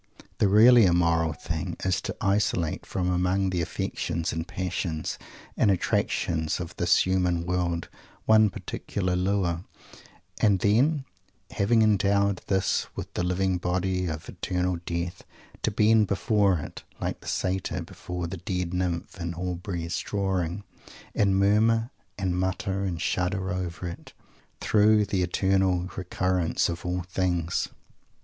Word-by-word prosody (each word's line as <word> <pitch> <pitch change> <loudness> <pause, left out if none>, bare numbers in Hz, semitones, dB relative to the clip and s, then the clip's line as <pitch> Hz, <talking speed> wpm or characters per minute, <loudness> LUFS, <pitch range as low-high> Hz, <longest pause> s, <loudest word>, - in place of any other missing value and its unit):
_ - - -15 0.2
The 105 - +4
really 115 +3 +7
immoral 85 -2 +3
thing 75 - -4
is 95 -2 +1
to - - -4
isolate, 95 -5 0
from 90 -2 -1
among 90 +2 +1
the 90 -2 0
affections 80 0 -2
and 80 +1 -3
passions 90 -3 -3 0.4
and 105 - +3
attractions 80 -3 0
of 90 0 -6
this 85 0 +3
human 90 -2 +1
world, 85 -1 -1 0.4
one 110 -1 +6
particular 90 -1 -3
lure; 90 -2 0 0.8
and 100 -3 +4
then, 130 - +2 0.5
having 110 +3 +3
endowed 100 -2 +2
this 95 -1 +1
with - - -6
the - - -1
living 90 +1 0
body 90 +1 -1
of 80 -2 -5
"eternal 90 -1 -2
death," 85 +1 -3 0.4
to - - +1
bend 110 0 +4
before 100 0 +2
it, 75 - -7 0.2
like - - -3
the - - -13
satyr 95 -1 -1
before 90 0 -6
the 85 +3 -5
dead 90 0 -3
nymph 90 -1 -2
in 85 0 -3
Aubrey's 90 -1 -3
drawing, 95 -2 -2 0.5
and 100 -2 +2
murmur 115 +4 +3 0.3
and 95 -3 -1
mutter 95 +1 -1
and 90 -3 -3
shudder 95 +2 -1
over 90 -1 -4
it, 85 - -9 0.5
through 105 0 +4
the 95 -2 -1
eternal 95 0 +2
recurrence 90 -2 0
of 85 +1 -5
all 90 0 -1
things! 90 -2 -1
90 Hz, 135 wpm, -27 LUFS, 85-100 Hz, 0.8 s, really